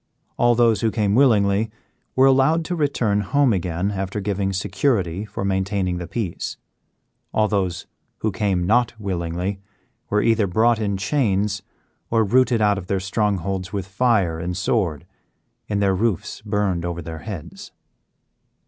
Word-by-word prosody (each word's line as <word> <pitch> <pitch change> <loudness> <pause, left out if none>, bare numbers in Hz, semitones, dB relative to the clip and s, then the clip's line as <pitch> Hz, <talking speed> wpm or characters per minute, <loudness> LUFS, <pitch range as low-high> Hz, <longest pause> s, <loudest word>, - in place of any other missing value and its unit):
All 120 0 +3
those 115 -2 +3
who 115 - +2
came 105 -2 0
willingly 110 -4 +3 0.5
were 130 - +5
allowed 135 +5 +4
to 180 - -2
return 125 -10 +1
home 135 +5 +2
again 90 +1 -1
after 95 +1 -3
giving 100 -1 -1
security 95 - 0
for 100 - -5
maintaining 95 -1 0
the 90 - -6
peace; 95 -2 -4 0.7
all 110 0 +2
those 95 -5 -1 0.4
who 110 - 0
came 95 -3 0
not 115 +2 +2
willingly 90 0 -3 0.5
were 105 0 +2
either 115 -3 +3
brought 110 +5 +3
in 100 -3 -1
chains 100 -2 0 0.5
or 115 -1 +3
rooted 120 +2 +3
out 105 -1 +3
of 90 - -10
their 95 0 0
strongholds 95 -2 -1
with 100 -3 -2
fire 95 -5 +1
and 90 +2 -3
sword, 90 - 0 0.6
and 100 -1 0
their 95 -1 +3
roofs 100 -2 -1
burned 100 -5 -1
over 85 -1 -4
their 80 0 -7
heads. 95 -3 -8
100 Hz, 150 wpm, -22 LUFS, 95-115 Hz, 0.7 s, were